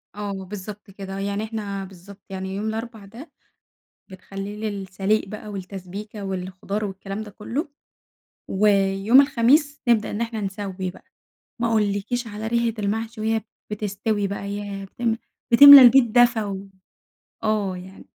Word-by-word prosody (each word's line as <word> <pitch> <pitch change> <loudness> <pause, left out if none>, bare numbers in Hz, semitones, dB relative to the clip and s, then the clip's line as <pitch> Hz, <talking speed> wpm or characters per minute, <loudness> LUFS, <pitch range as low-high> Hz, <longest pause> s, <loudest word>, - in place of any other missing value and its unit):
آه 205 -1 -4
بالضبط 195 +2 -8
كده، 195 0 -7
يعني 200 +1 -2
إحنا 210 -3 -4
بالضبط، 190 +2 -14
يعني 190 0 -5
يوم 205 +2 -3
الأربع 225 -1 -5
ده، 245 +10 -12 0.8
بنخلّيه 195 +3 -6
للسليق 195 +1 -1
بقى 215 +2 -8
والتسبيكة 200 +2 -7
والخضار 190 +2 -4
والكلام 195 +2 -6
ده 210 - -11
كُلّه. 235 - -4 0.8
ويوم 200 +4 +4
الخميس 280 +2 +2
نبدأ 225 -3 +2
إن 210 - -3
إحنا 230 -2 -3
نسَوّي 195 -1 -4
بقى. - - -17 0.6
ما 235 - +2
أقولكيش 215 +2 0
على 215 0 -6
ريحة 235 0 +1
المحشي 220 +2 -3
وهي 220 0 0 0.3
بتستوي 205 0 -2
بقى، 200 0 -5
ياه! 200 -1 -5
بتم 230 +3 -2 0.4
بتملا 285 +3 +12
البيت 255 +1 +8
دفى 240 -1 +4
و 195 -1 -6 0.7
آه 210 -4 0
يعني 185 +2 -11
205 Hz, 135 wpm, -23 LUFS, 195-225 Hz, 0.8 s, بتملا